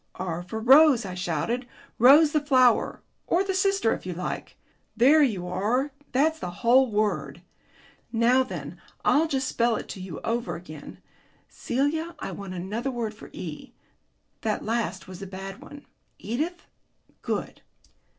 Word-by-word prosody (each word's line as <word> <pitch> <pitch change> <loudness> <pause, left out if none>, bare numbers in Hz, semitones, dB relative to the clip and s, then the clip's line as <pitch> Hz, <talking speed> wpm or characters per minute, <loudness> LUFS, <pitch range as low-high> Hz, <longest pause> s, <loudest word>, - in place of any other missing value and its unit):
"R 175 -2 -4
for 185 +5 -6
Rose," 265 0 +6
I 185 - -5
shouted. 180 - -2 0.3
"Rose 290 +6 +7
the 305 - +2
flower 255 -5 +3 0.2
or 355 +3 +2
the 390 -1 -2
sister 390 - +2
if - - -6
you 180 - -4
like. 180 +2 -5 0.4
There 285 +6 +6
you 200 -11 +1
are, 235 +10 0 0.2
that's 315 +5 +2
the 180 - -4
whole 245 +7 +3
word. 210 -1 -1 0.7
Now 240 +3 +4
then, 255 - -6 0.2
I'll 315 +3 +4
just 270 -3 -1
spell 235 -2 +1
it - - -5
to 190 - -7
you 185 -5 -7
over 235 +1 -2
again.... 155 -4 -10 0.5
Celia, 315 +6 -2
I - - -5
want 195 -2 -7
another 210 +9 -3
word 235 -4 -3
for 210 - -13
E. 160 -4 -8 0.7
That 215 -2 -2
last 230 -1 -2
was 185 0 -10
a 195 - -6
bad 195 +1 -8
one." 290 -1 -12 0.3
"Edith?" 310 +11 -4 0.6
"Good." - - -4
235 Hz, 150 wpm, -26 LUFS, 195-280 Hz, 0.7 s, Rose